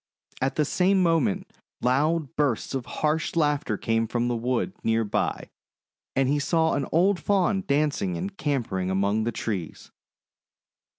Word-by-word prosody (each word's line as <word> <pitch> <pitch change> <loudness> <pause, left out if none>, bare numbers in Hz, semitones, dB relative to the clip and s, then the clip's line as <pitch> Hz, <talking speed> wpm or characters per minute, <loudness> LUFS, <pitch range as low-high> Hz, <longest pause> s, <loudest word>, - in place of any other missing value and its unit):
At 135 +1 0
the 150 - +2
same 185 +5 +2
moment 190 +4 +1 0.3
loud 150 +5 +1
bursts 140 -6 0
of 130 -2 -3
harsh 155 +2 -1
laughter 145 -9 +1
came 115 +1 0
from 120 +1 -1
the 120 - 0
wood 125 +9 -1
near 115 0 +2
by, 105 - -2 0.6
and 135 -1 +2
he 145 +2 +2
saw 160 +3 +2
an 140 -2 -1
old 180 +3 +3
Faun 195 -1 +1
dancing 155 +6 +1
and 195 +1 -5
capering 115 - -1
among 100 +3 +1
the 120 - 0
trees. 100 -8 -5
145 Hz, 145 wpm, -26 LUFS, 115-165 Hz, 0.6 s, old